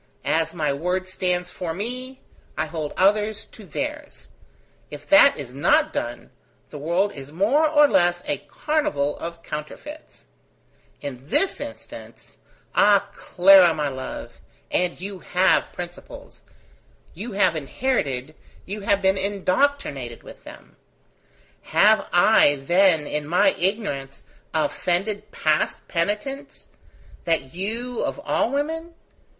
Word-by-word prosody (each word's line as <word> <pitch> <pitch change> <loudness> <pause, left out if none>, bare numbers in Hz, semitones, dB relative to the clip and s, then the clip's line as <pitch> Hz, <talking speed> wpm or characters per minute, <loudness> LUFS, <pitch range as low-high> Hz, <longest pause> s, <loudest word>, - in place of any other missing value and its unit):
As 165 0 +1
my 155 -4 -1
word 180 +6 -2
stands 180 -1 -2
for 165 -3 -5
me, 255 +6 -5 0.4
I 155 - 0
hold 155 -1 -5
others 210 +2 +2
to 215 - -13
theirs. 295 - -6 0.6
If - - -10
that 295 -1 +7
is 130 -4 -7
not 140 - +2
done, - - -5 0.4
the 150 - -8
world 175 +7 0
is 135 0 -10
more 245 - +2
or 295 -1 +6
less 175 -6 +2
a - - -2
carnival 150 - -1
of 170 0 -7
counterfeits. 280 - -9 0.8
In 135 -2 -7
this 390 - +2
instance - - -10 0.3
Ah! 200 -1 +4
Clara, 180 -2 +5
my 150 -2 -1
love! 130 -1 -8 0.3
and 180 -1 0
you 195 +1 -6
have 180 +1 +2
principles: 175 0 -10 0.7
you 210 +6 -7
have 190 -4 +3
inherited, 150 - -2 0.3
you 205 +3 -5
have 200 0 +1
been 190 0 +3
indoctrinated 195 - -1
with - - -13
them: - - -14 1.0
have - - +5
I, 145 - +5
then, 165 +3 +3
in 150 0 -3
my 180 - +4
ignorance, 180 - -3 0.3
offended 185 +7 -1
past 155 -6 -1
penitence, 210 +11 -3 0.6
that 160 -6 -1
you, 230 +7 -3
of - - -3
all 290 - 0
women? 320 +5 -3
185 Hz, 120 wpm, -23 LUFS, 155-220 Hz, 1.0 s, that